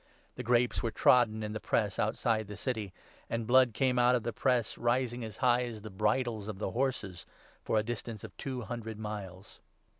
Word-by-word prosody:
The - - -6
' 120 - -10
grapes 120 0 +3
were 115 - 0
trodden 120 -1 +4
in 105 - -3
20 - - -5
the 110 - -3
press' 105 -3 0
outside 110 0 +1
the 105 -1 -8
city; 110 -3 -3 0.4
and 115 -1 -2
blood 125 -1 +5
came 130 -2 +2
out 125 +1 +5
of 120 - -1
the 120 +1 -3
press, 125 -2 +1
rising 120 0 0
as 110 -3 -7
high 125 0 +4
as 110 -3 -7
the 110 - -7
bridles 110 +2 0
of 110 -3 -5
the 105 - -3
horses 120 -9 -2 0.3
for - - 0
a 105 - +3
distance 115 -1 -5
of - - -9
two 130 -2 -4
hundred 110 0 -5
miles. 100 -3 -7
115 Hz, 210 wpm, -31 LUFS, 105-125 Hz, 0.4 s, blood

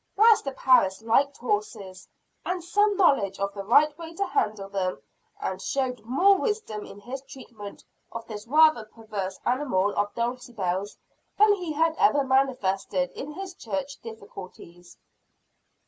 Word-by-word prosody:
Master 425 -9 +5
Parris 240 -7 +3
liked 275 +5 +2
horses, 410 - -3 0.4
had 360 -1 -3
some 410 +3 +2
knowledge 250 - +3
of 200 0 -2
the 200 - -6
right 290 +8 +4
way 330 0 -8
to 400 - -1
handle 215 - -1
them, 190 -2 -2 0.4
and - - -4
showed 255 -4 -2
more 370 - +4
wisdom 420 - -2
in - - -11
his 255 +6 -7
treatment 235 -7 -11 0.3
of 230 0 -7
this 215 0 -8
rather 310 -3 +5
perverse 210 -4 -6
animal 240 -7 +1
of 205 0 0
Dulcibel's 230 -6 -3 0.4
than 420 0 +6
he 360 -5 -4
had 320 +1 +1
ever 290 -9 +4
manifested 265 -2 0
in 285 - -7
his 385 +2 -7
church 285 -6 -5
difficulties. 185 -5 -11
255 Hz, 140 wpm, -26 LUFS, 205-320 Hz, 0.4 s, than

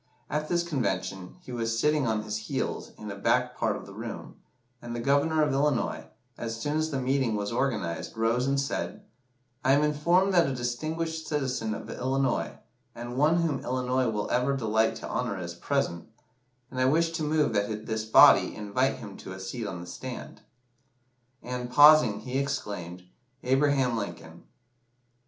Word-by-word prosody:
At 150 +1 -1
this 175 -1 +2
Convention, 95 - -2
he 130 - -11
was 115 -1 -1
"sitting 150 +1 +2
on 110 -1 0
his 105 0 -3
heels" 110 - -3
in 105 -1 -7
a - - -6
back 100 - +1
part - - 0
of - - -8
the - - -11
room, - - -7 0.5
and 120 0 -6
the - - -3
Governor 145 +5 +2
of 145 -2 +1
Illinois, 140 -2 0 0.3
as 115 -1 -4
soon 145 +6 -1
as 155 0 0
the 140 -3 -2
meeting 130 -3 +1
was 105 +1 -2
organised, 110 -11 -2
rose 115 +3 +1
and 140 0 +2
said 135 - -3 0.6
"I 135 - +4
am 145 +2 +4
informed 170 +6 +2
that 170 -4 +5
a 135 - -2
distinguished 155 +6 -3
citizen 130 -7 -1
of - - -8
Illinois, 130 0 -1 0.4
and 120 +1 -6
one 155 +5 +3
whom 150 -5 0
Illinois 130 -1 0
will 105 -2 -2
ever 125 +3 +1
delight 110 -2 +1
to - - -7
honour, - - -2
is 85 -1 -5
present, 85 -2 -2 0.6
and 130 -1 -2
I - - +4
wish 165 +5 +3
to 160 -1 -3
move 150 0 +1
that 105 +1 -1
this 110 -1 -2
body 110 - +6
invite 105 +6 0
him 105 -6 -9
to 95 - -8
a 95 - -9
seat 105 +4 -5
on 90 -3 -5
the - - -8
stand." 125 +8 -8 1.0
And, 125 0 -4
pausing, 145 -8 +7
he 130 +3 -2
exclaimed, 95 -10 -4 0.4
"Abraham 135 -1 +2
Lincoln." 85 -5 -6
125 Hz, 175 wpm, -28 LUFS, 110-145 Hz, 1.0 s, pausing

